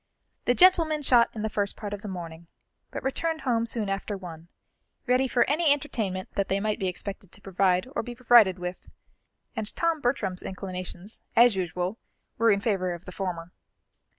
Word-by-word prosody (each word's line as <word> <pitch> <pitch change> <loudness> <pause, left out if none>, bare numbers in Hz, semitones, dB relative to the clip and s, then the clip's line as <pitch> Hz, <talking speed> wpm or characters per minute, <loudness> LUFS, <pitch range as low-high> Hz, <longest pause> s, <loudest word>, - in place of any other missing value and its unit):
The 245 - +3
gentlemen 330 -4 +5
shot 240 -3 +5
in 215 - -4
the - - +1
first 205 -1 -1
part 205 -1 -6
of 205 - -6
the 210 - -7
morning, 170 -3 -7 0.4
but - - -6
returned 320 +4 -1
home 235 -3 0
soon 225 -2 -1
after 195 +1 -3
one, 170 -3 -10 0.6
ready 255 0 +3
for 245 -1 +2
any 305 +2 +3
entertainment 220 -10 -1
that 200 - -1
they 195 - 0
might 210 +1 -1
be 190 - -1
expected 195 +1 -6
to - - -10
provide 190 0 +1
or - - +1
be 245 -1 -8
provided 235 -6 +5
with; 180 0 -6 0.7
and 215 -1 -2
Tom 335 -2 0
Bertram's 205 -8 -1
inclinations, 185 +1 -7
as 240 -2 +6
usual, 180 +3 -2 0.4
were 230 0 +4
in 200 -2 +3
favour 185 -5 0
of 170 - -13
the 180 - -8
former. 180 -3 -4
205 Hz, 180 wpm, -27 LUFS, 185-245 Hz, 0.7 s, as